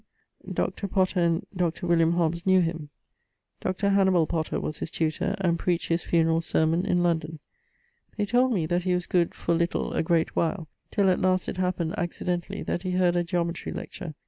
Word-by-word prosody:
Oxon._). - - -5
Dr. 200 - -1
Potter 185 -1 +1
and 170 -1 +1
Dr. 175 -1 -1 0.3
Hobbes 170 0 0
knew 190 0 +6
him. 165 -3 -2 0.7
Dr. 190 +2 -1
Hannibal 190 -4 +4
Potter 160 0 -2
was 155 - -4
his - - -4
tutor, 160 -2 -1
and 170 -3 +1
preached 175 -2 -1
his 165 0 +1
funeral 165 -1 +2
sermon 165 +2 +1
in 175 0 +2
London. 160 -2 0 0.8
They 210 - +1
told 245 +4 +3
me 180 -9 +1
that 175 +3 0
he 180 0 +1
was 180 -1 -2
good 175 -2 +1
for 170 - -1
little 170 +1 0
a - - +1
great 165 0 +1
while, 170 0 -1 0.2
till 200 -1 +2
at 185 - +2
last 185 0 +2
it - - -4
happened 180 -3 -1
accidentally, 175 0 -3
that 175 - -2
he 185 -1 -3
heard 180 -1 +2
a 175 - +2
Geometrie 170 0 -2
lecture. 160 -4 -7
175 Hz, 190 wpm, -26 LUFS, 165-185 Hz, 0.8 s, knew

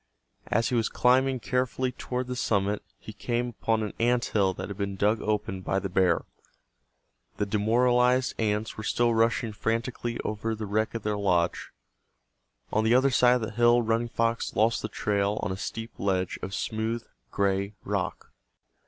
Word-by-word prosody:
As 115 - +1
he 125 - 0
was 115 -2 +1
climbing 130 +1 +3
carefully 125 +1 -1
toward 125 0 -4
the 125 0 -4
summit 100 -4 0 0.2
he 110 - -10
came 120 +3 -2
upon 110 -1 -1
an 105 - -4
ant 120 +1 +2
hill 100 -3 +2
that - - -5
had 100 - -6
been 100 0 -3
dug 105 +3 +1
open 105 -3 -2
by 95 - -1
the 95 0 -2
bear. 90 -2 +2 1.1
The 105 - 0
demoralized 125 +5 +2
ants 105 0 -1
were 110 - -5
still 120 +2 +2
rushing 115 0 +1
frantically 115 +2 -2
over 110 +1 -2
the 110 0 -5
wreck 110 +3 -1
of 115 - -4
their 105 -1 -1
lodge. 90 -4 +1 1.0
On 110 - +2
the 110 +2 +4
other 135 +2 +4
side 125 -1 +5
of 125 - -1
the 110 - -3
hill 120 +2 +4
Running 115 +1 0
Fox 115 0 -1
lost 110 +3 +2
the 110 - -4
trail 100 0 0
on - - -1
a - - -2
steep 115 +3 -5
ledge 95 -2 -1
of 95 +1 -4
smooth 110 +2 -2 0.3
gray 100 +1 0
rock. - - -3
110 Hz, 175 wpm, -27 LUFS, 100-120 Hz, 1.1 s, side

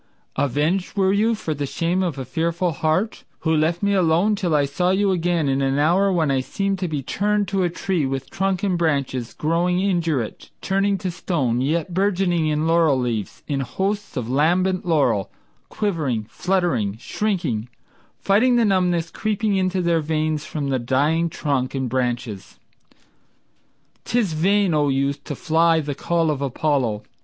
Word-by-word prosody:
Avenged 150 - 0
were 190 -1 +3
you 220 +3 +2
for 160 -7 -3
the 145 -1 -3
shame 170 +6 -1
of 170 -6 -2
a 135 - -4
fearful 170 +6 -1
heart 160 +8 -1 0.2
Who 160 -1 +1
left 165 +4 +1
me 200 0 +2
alone 180 +2 +3
till 175 -6 0
I 145 -1 +3
saw 160 +6 0
you 195 +1 +2
again 175 -3 0
in 135 0 +1
an 135 0 +1
hour 180 +7 +3
When 160 -6 +1
I 135 - +2
seemed 195 +9 -2
to 180 - -1
be 150 -4 -3
turned 205 +7 0
to 195 -1 0
a 175 - +2
tree 170 -3 -1
with 135 0 -4
trunk 190 -1 -1
and 185 -4 +1
branches 140 -7 -1
Growing 175 +3 +1
indurate, 165 - -1
turning 195 +1 +1
to 185 0 -3
stone, 135 -9 -1
yet 165 +5 -1
burgeoning 180 -3 +1
In 155 0 0
laurel 165 -4 +3
leaves, 115 -6 -3
in 140 -2 -1
hosts 195 +7 -3
of 120 -3 -2
lambent 180 +8 +1
laurel, 145 - +2 0.4
Quivering, 155 - -1
fluttering, 170 - 0
shrinking, 155 - -2 0.5
fighting 225 +6 +3
the 235 -1 +4
numbness 180 -4 +1
Creeping 215 0 -1
into 185 -1 0
their 170 -1 +2
veins 155 0 -1
from 145 -3 -3
the 130 -1 0
dying 145 +7 +1
trunk 140 -4 -2
and 130 -1 -1
branches! 120 -5 -3 1.5
'Tis 225 -8 0
vain, 190 +3 +2
O 145 -2 +2
youth, 140 +1 -1
to 145 - -4
fly 165 +3 +2
the 145 -2 -3
call 165 +2 0
of 140 -2 -3
Apollo. 135 -5 0
165 Hz, 165 wpm, -22 LUFS, 140-190 Hz, 1.5 s, the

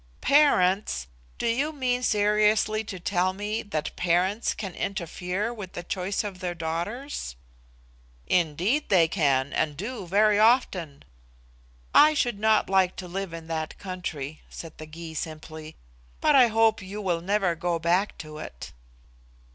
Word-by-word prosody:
"Parents! 210 - +3 0.3
Do - - -3
you 265 +7 +1
mean 255 -4 -1
seriously 215 0 +2
to 195 -4 -6
tell 185 0 0
me 210 +3 -3
that 160 -9 -4
parents 180 +5 +1
can 195 -4 -5
interfere 190 +3 -3
with 200 -6 -8
the 175 - -6
choice 190 +3 -2
of 200 -3 -6
their 180 -2 -3
daughters?" 170 - -4 0.9
"Indeed 180 - +1
they 175 -5 +5
can, 140 -5 +1
and 150 -2 0
do 210 - -5
very 205 +3 +4
often." 195 - +2 0.9
"I 305 +1 +7
should 240 -8 0
not 220 0 +3
like 190 -1 +2
to 185 - -7
live 190 0 -4
in 165 -1 -8
that 160 -1 -3
country," 160 -6 -6
said 165 -2 -9
the 155 - -8
Gy 160 +1 -8
simply; 155 0 -7 0.4
"but 300 - +3
I 255 -3 +7
hope 225 -1 +3
you 195 +3 -7
will 175 -5 -1
never 195 -1 +1
go 170 +1 -1
back 175 +5 +1
to 155 0 -9
it." - - -8
185 Hz, 145 wpm, -26 LUFS, 165-215 Hz, 0.9 s, I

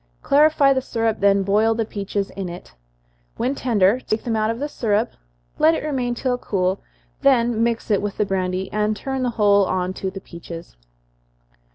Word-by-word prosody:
Clarify 290 -1 +4
the 260 - 0
syrup, 225 -3 -1
then 200 0 +3
boil 215 +3 +2
the 225 0 -1
peaches 200 -1 -3
in 190 -2 -5
it. 175 +1 -10 0.6
When 250 +4 0
tender, 230 -4 +2
take 215 -3 -3
them 230 -2 -1
out 215 0 +1
of 230 - -2
the 290 +4 -3
syrup, 225 -5 0 0.5
let 320 +1 +5
it - - -4
remain 255 -5 -1
till 250 0 -1
cool, 190 -3 -1 0.4
then 240 -4 +3
mix 230 -1 0
it 205 - +3
with 205 -1 -4
the 210 - +1
brandy, 185 -1 -2
and 210 0 0
turn 265 +4 -3
the 250 - +1
whole 205 -2 +4
on 185 0 -1
to 190 - -4
the 195 +1 -8
peaches. 170 - -10
215 Hz, 185 wpm, -22 LUFS, 195-245 Hz, 0.6 s, let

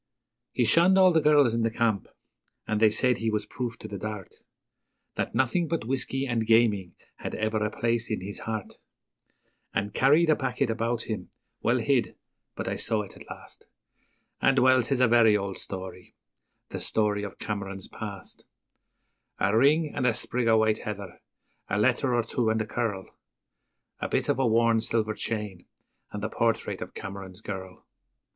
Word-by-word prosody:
He 120 - +1
shunned 170 - +5
all 185 -1 +7
the 160 -2 +3
girls 145 -5 +5
in 115 - 0
the 115 - +2
camp, 110 -3 0 0.6
and 110 -1 -1
they 110 0 +6
said 125 +3 +1
he 115 - 0
was 105 -1 -1
proof 120 -2 -5
to - - -8
the 100 - -6
dart 105 -2 -6 0.8
That - - -3
nothing 130 +8 +1
but 165 -7 -2
whisky 135 +2 -1
and 115 -4 -1
gaming 110 -5 +3 0.2
had - - -5
ever 110 0 0
a 105 - 0
place 115 +1 -1
in 110 - -1
his 100 +2 -6
heart; 110 -3 -5 1.0
He 100 - 0
carried 150 +8 +4
a - - +5
packet 130 -2 -1
about 115 +1 -1
him, 110 - -5 0.3
well - - +2
hid, - - +1 0.4
but - - -4
I - - -2
saw 110 -2 0
it 100 - -11
at - - -14
last, - - -12 0.7
And 135 0 +3
well, 130 0 +5
'tis 125 +2 -1
a 125 - +6
very 115 -2 +5
old 100 -1 -4
story 95 -1 -8 0.5
the - - -5
story 105 -2 0
of 100 -2 -7
Cameron's 100 -2 -5
past: 100 -3 -8 0.9
A 100 +2 +2
ring 150 +6 +3
and 125 - 0
a 115 - +2
sprig 125 -1 -2
o' 110 0 +5
white 110 -1 +2
heather, 100 -3 -7 0.5
a 105 - 0
letter 120 +4 +2
or 120 - +2
two 115 0 -1
and 110 0 +1
a 110 - -1
curl, 105 -4 -2 0.9
A - - -3
bit - - 0
of - - +1
a 130 - +3
worn 115 0 +3
silver 110 -2 0
chain, 105 -5 -5 0.4
and 105 0 -6
the - - 0
portrait 115 0 -1
of - - -7
Cameron's 95 -1 -8
girl. 95 -2 -7
110 Hz, 180 wpm, -27 LUFS, 105-125 Hz, 1.0 s, all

